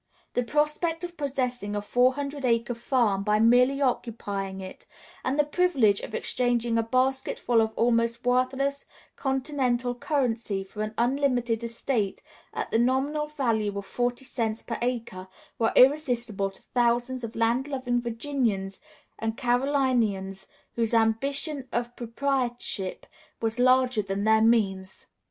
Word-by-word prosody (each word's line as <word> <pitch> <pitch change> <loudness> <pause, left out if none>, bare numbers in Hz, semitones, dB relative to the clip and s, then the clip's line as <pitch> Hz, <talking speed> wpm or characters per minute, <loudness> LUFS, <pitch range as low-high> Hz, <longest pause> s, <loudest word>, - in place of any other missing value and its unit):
The 245 - +1
prospect 300 +6 0
of 350 0 -6
possessing 250 -8 -2
a - - 0
four 250 +4 +3
hundred 285 0 -4
acre 235 -1 +1
farm 230 -4 +1
by 210 +1 +2
merely 250 +4 +4
occupying 205 -6 -2
it, 185 0 -10 0.4
and 260 +2 -1
the 295 - +5
privilege 290 - +2
of - - -7
exchanging 240 -2 0
a 230 - +3
basketful 255 -1 +1
of 220 0 0
almost 235 0 +1
worthless 265 +3 0 0.3
continental 265 -3 0
currency 240 -7 -1
for 200 +2 -8
an 215 0 -3
unlimited 245 -2 +1
estate 230 -3 -2 0.3
at - - -4
the 225 - +3
nominal 270 +5 +1
value 225 -9 -1
of 200 - -5
forty 245 +4 -2
cents 225 -3 -2
per 230 - -4
acre, 230 -6 -3 0.3
were 225 - +2
irresistible 245 -8 +3
to 195 - -16
thousands 245 +1 +1
of 230 0 -6
land 235 +4 +1
loving 255 -3 -1
Virginians 230 -5 -2 0.4
and 225 0 -2
Carolinians 245 -7 0 0.3
whose 230 0 0
ambition 270 +5 0
of 240 0 -2
proprietorship 240 -5 -2 0.3
was 225 +1 -2
larger 255 -2 +4
than 195 0 -3
their 220 0 +4
means. 195 -5 +1
240 Hz, 135 wpm, -27 LUFS, 225-265 Hz, 0.4 s, the